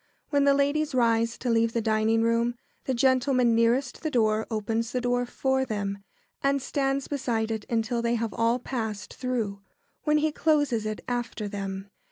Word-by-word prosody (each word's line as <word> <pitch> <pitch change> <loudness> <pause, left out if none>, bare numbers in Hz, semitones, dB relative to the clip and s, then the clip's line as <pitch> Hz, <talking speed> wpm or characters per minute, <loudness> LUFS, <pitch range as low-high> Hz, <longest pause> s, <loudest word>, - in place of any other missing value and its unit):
] - - -45
When 285 -1 +3
the 280 0 +5
ladies 285 +1 +1
rise 230 -1 +2
to 250 - -3
leave 230 0 +2
the 235 - +1
dining 220 +1 +2
room, 230 +1 +1 0.3
the 260 - 0
gentleman 255 -1 +3
nearest 235 +3 +1
the 315 - -1
door 220 -4 +1
opens 225 +1 -1
the 250 - +1
door 245 0 0
for 265 +1 0
them, 200 -4 -3 0.4
and 275 0 +2
stands 275 0 -1
beside 230 -6 -1
it 220 -2 -3
until 235 +1 0
they 235 0 +1
have 230 -2 -2
all 230 +1 +2
passed 220 -5 -4
through, 230 -6 -3 0.4
when 300 0 +2
he 305 +1 +1
closes 290 -8 +1
it 215 -1 -4
after 240 -3 -3
them. 195 -1 -5
235 Hz, 180 wpm, -27 LUFS, 220-265 Hz, 0.4 s, the